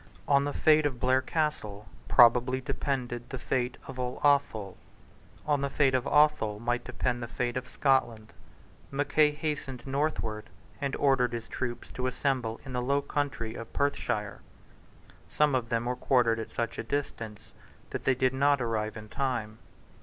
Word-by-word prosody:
On 140 0 +4
the 145 - -1
fate 155 0 +4
of 130 -4 -6
Blair 130 +1 +3
Castle 120 - -2 0.2
probably 125 +2 +5
depended 125 -2 -3
the 130 - -4
fate 125 0 -1
of 130 -1 -8
all 125 0 -3
Athol. 115 -9 +2 0.7
On 145 -2 +1
the 140 - 0
fate 135 -1 +2
of 130 0 +1
Athol 150 -9 +3
might 120 +1 -1
depend 125 -1 -2
the 120 - -4
fate 120 0 -2
of 125 0 -4
Scotland. 120 -6 +1 0.6
Mackay 145 +2 +3
hastened 150 -5 -4
northward, 135 -6 -2 0.3
and 140 -1 -1
ordered 130 -4 +2
his 115 -1 -4
troops 120 -2 -5
to 130 0 -2
assemble 125 -4 -1
in 130 - -7
the 125 - -1
low 140 +3 +1
country 140 -6 -2
of 115 -1 -8
Perthshire. 110 -8 -1 0.9
Some 150 -1 +2
of 125 -3 0
them 115 0 0
were 125 +1 -1
quartered 120 -3 +2
at 110 - -5
such 115 -1 -3
a - - -2
distance 115 -4 -4 0.4
that - - -4
they 130 - +3
did 130 0 +1
not 140 +1 +3
arrive 110 -3 -2
in 110 0 -9
time. 115 -4 -2
125 Hz, 165 wpm, -29 LUFS, 115-140 Hz, 0.9 s, probably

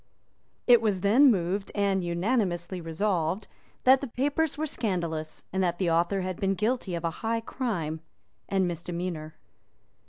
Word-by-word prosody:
It 240 -2 +7
was 205 -5 0
then 240 +9 +6
moved 195 -1 0
and 200 -2 +1
unanimously 175 -1 -1
resolved 170 +2 -1 0.4
that 260 +1 +6
the 275 - -3
papers 285 +5 0
were 310 - -1
scandalous, 170 - -3
and 190 0 +1
that 175 -1 0
the 175 -3 +1
author 170 +4 +2
had 185 -1 -4
been 195 0 +1
guilty 215 -3 -1
of 170 - -4
a 165 - 0
high 225 0 0
crime 175 - -3 0.5
and 190 -2 +2
misdemeanour. 170 -2 -4
190 Hz, 150 wpm, -28 LUFS, 170-225 Hz, 0.5 s, It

